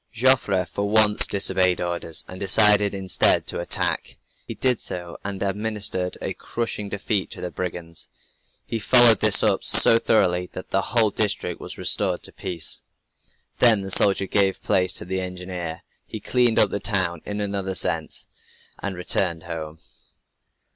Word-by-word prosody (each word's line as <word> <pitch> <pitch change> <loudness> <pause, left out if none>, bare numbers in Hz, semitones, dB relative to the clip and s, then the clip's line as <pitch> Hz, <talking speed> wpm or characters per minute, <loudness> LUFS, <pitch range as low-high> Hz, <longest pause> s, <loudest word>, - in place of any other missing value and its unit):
Joffre 115 -6 +1
for 100 +2 -4
once 105 -1 +5
disobeyed 95 -2 +1
orders, 85 -2 0
and 90 - -8
decided, 105 0 +4
instead, 95 -2 +2
to - - -3
attack. 85 - -2 0.3
He - - -7
did 130 -2 +1
so, 90 -1 -5
and 100 -1 -5
administered 100 -2 -2
a - - -2
crushing 115 -3 -5
defeat 100 0 -2
to - - -9
the 90 - -6
brigands. 85 -2 -7 0.6
He 115 - -4
followed 115 +2 +6
this - - +4
up - - +1
so 115 - +5
thoroughly, 90 -6 +1
that 95 - -9
the 95 - +1
whole 110 +1 +1
district 105 0 -1
was - - -8
restored - - 0
to - - -5
peace. 90 -4 -5 0.8
Then 115 -4 +5
the 95 0 -6
soldier 95 0 +4
gave 95 -1 0
place 90 -1 +1
to - - -6
the 95 +1 -3
engineer. 90 -2 -7 0.2
He 110 - -7
cleaned 120 +2 +1
up 105 - +4
the 100 - -2
town 90 -7 -1
(in 105 0 -6
another 100 -2 -3
sense) - - -1 0.5
and 100 -2 -5
returned 90 -2 0
home. 80 -2 -7
95 Hz, 155 wpm, -22 LUFS, 90-105 Hz, 0.8 s, followed